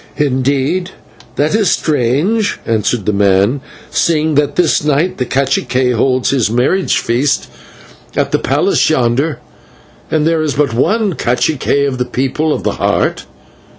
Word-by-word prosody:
"Indeed! 140 +5 0 0.5
That 150 +4 0
is 210 -4 +2
strange," 155 - 0
answered 110 -1 -1
the 105 - 0
man, 100 +6 +2 0.3
"seeing 160 -1 +1
that 145 0 +1
this 170 -4 +2
night 150 +4 0
the 125 - -1
/cacique/ 130 -1 0
holds 130 +2 +1
his 130 -6 +1
marriage 130 - +1
feast 125 +5 0 0.7
at - - 0
the - - +1
palace - - +1
yonder, 130 +5 +1 0.7
and 155 -1 +1
there 165 0 +1
is 155 -3 -1
but 145 -4 +1
one 205 - +1
/cacique/ 140 +2 0
of 130 -2 -4
the 125 - 0
People 135 +5 -1
of - - -2
the - - -2
Heart! - - 0
140 Hz, 145 wpm, -14 LUFS, 125-155 Hz, 0.7 s, is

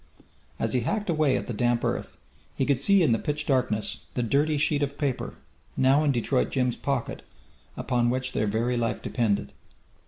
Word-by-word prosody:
As - - -1
he 125 - +3
hacked 205 - -1
away 155 -4 +2
at - - -4
the 120 - -4
damp 120 +2 +1
earth, - - -3 0.4
he 135 - 0
could 140 -2 +1
see 195 +5 +4
in 155 - +3
the 115 - +2
pitch 150 -1 -2
darkness 125 -6 0
the 125 - 0
dirty 145 +6 +2
sheet 145 0 +1
of 140 0 -2
paper, 140 -4 -2 0.4
now 135 +3 +4
in 145 - +3
Detroit 125 +1 0
Jim's 125 -3 0
pocket, 140 -4 -3 0.6
upon 120 -1 +1
which 130 +1 -1
their 110 - 0
very 115 +4 0
life 115 -1 -1
depended. 110 -5 -1
130 Hz, 185 wpm, -26 LUFS, 120-145 Hz, 0.6 s, see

